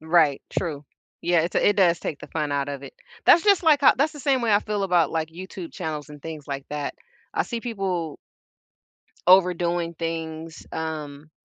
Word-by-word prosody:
Right. 160 -3 +3
True. 150 -5 -3 0.4
Yeah, 175 -1 +3
it's 170 - -3
it 205 - +3
does 175 -3 +4
take 145 - -4
the - - -10
fun 150 -2 -2
out 140 0 -1
of 140 -1 -5
it. 135 - -10 0.3
That's 335 - +6
just 400 -3 +5
like, 300 -3 +4
uh - - +7
that's 295 +4 +2
the 295 - -10
same 265 -2 +2
way 225 -3 +2
I 205 - +6
feel 210 -1 -3
about 175 -5 +3
like 160 -1 -1
YouTube 180 0 -8
channels 155 -4 -5
and 150 -1 -11
things 155 -2 -8
like 135 -1 -4
that. 150 -1 -3 0.4
I - - +2
see 235 -2 -4
people 190 - -3 1.1
overdoing 175 -2 +4
things, 165 -1 -5
um, 155 -2 -5
165 Hz, 190 wpm, -24 LUFS, 155-195 Hz, 1.1 s, uh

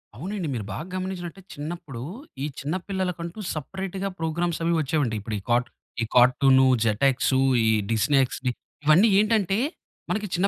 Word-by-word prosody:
అవునండి. 180 - -4
మీరు 110 -5 -3
బాగా 155 - -5
గమనించినట్టయితే 185 -1 -5
చిన్నప్పుడూ, 150 -5 -6 0.4
ఈ - - 0
చిన్న 150 +6 -2
పిల్లలకంటూ 180 -1 -3
సపరేట్‌గా 190 +5 -4
ప్రోగ్రామ్సవి 165 +1 0
వచ్చేవండి. 140 -5 0
ఇప్పుడు 110 +1 -4
ఈ - - -13
కార్ట్ 120 +1 +2 0.3
ఈ - - 0
కార్టూనూ, 130 +2 +6 0.2
జటెక్సూ, 130 +4 +2 0.3
ఈ - - +4 0.2
డిస్నీ 125 +6 +2
ఎక్స్‌డీ, 125 0 -3 0.3
ఇవన్నీ 160 +9 +6
ఏంటంటే, 210 -3 +2 0.5
మనకి 210 -1 -1
చిన్న 185 +3 +2
160 Hz, 140 wpm, -25 LUFS, 130-185 Hz, 0.5 s, కార్టూనూ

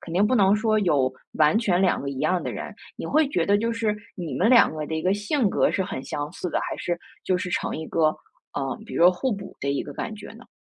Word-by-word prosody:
肯 165 - -9
定 190 +4 +3
不 255 - +2
能 200 -3 +5
说 215 0 +2
有 145 -10 +2 0.2
完 155 +7 +4
全 190 -6 +1
两 190 -2 +2
个 140 - -4
一 135 - -6
样 180 +5 +1
的 - - -3
人。 - - -6 0.2
你 - - -5
会 310 0 +3
觉 - - 0
得 205 - +4
就 230 +3 0
是， 225 -2 -1 0.2
你 170 -8 -5
们 190 - +2
两 245 -2 +7
个 155 -1 -4
的 160 - -4
一 160 - -1
个 185 +2 +2
性 210 +4 +1
格 - - +2
是 190 - 0
很 185 -8 -5
相 145 +2 -4
似 180 -1 -5
的， - - 0
还 - - -4
是 175 -1 -2 0.3
就 185 - +2
是 180 - -3
成 - - -1
一 160 0 -5
个， 155 -2 +2 0.4
呃， 135 -1 -3
比 - - -11
如 - - +2
说 175 - +9
互 205 +8 -1
补 200 -1 -8
的 140 - -1
一 140 - -1
个 - - -8
感 220 - -4
觉 210 -1 -10
呢？ 235 +2 -14
185 Hz, 300 characters per minute, -25 LUFS, 160-215 Hz, 0.4 s, 说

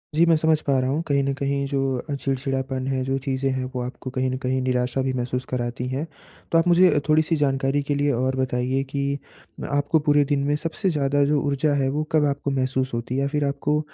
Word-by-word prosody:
जी, 165 +2 +5
मैं 165 -1 +5
समझ 160 0 +2
पा 140 -2 +1
रहा 130 - 0
हूँ 145 +4 0
कहीं 140 -2 +2
न 140 - 0
कहीं 140 0 -1
जो 140 -1 -1 0.3
अ, - - -1
चिड़चिड़ापन 135 -1 -2
है, 130 -1 0
जो 135 +1 -1
चीज़ें 135 0 -1
हैं 130 0 -2
वो 125 - -1
आपको 125 +1 -6
कहीं 130 0 -1
न 130 - -2
कहीं 130 0 -1
निराशा 125 0 0
भी 130 0 -1
महसूस 125 0 -2
कराती 120 0 -3
हैं। 135 +5 -2 0.5
तो 165 - +4
आप 165 +2 +3
मुझे 175 -3 +5
थोड़ी-सी 155 +1 +3
जानकारी 135 -1 +1
के 145 0 -1
लिए 145 0 +1
और 130 +2 0
बताइए 130 0 0
कि 140 0 -1 0.6
आपको 145 +3 +2
पूरे 145 -1 +3
दिन 140 -1 +1
में 145 - +2
सबसे 165 +5 -2
ज़्यादा 145 -3 +1
जो 145 0 +2
ऊर्जा 145 +1 +1
है 135 - +1
वो 150 +2 -1
कब 155 -2 +3
आपको 140 0 -2
महसूस 130 -1 -1
होती 120 +2 -3
है? 140 - +1
फिर 145 0 0
आपको 150 +2 0
140 Hz, 230 wpm, -23 LUFS, 130-145 Hz, 0.6 s, जी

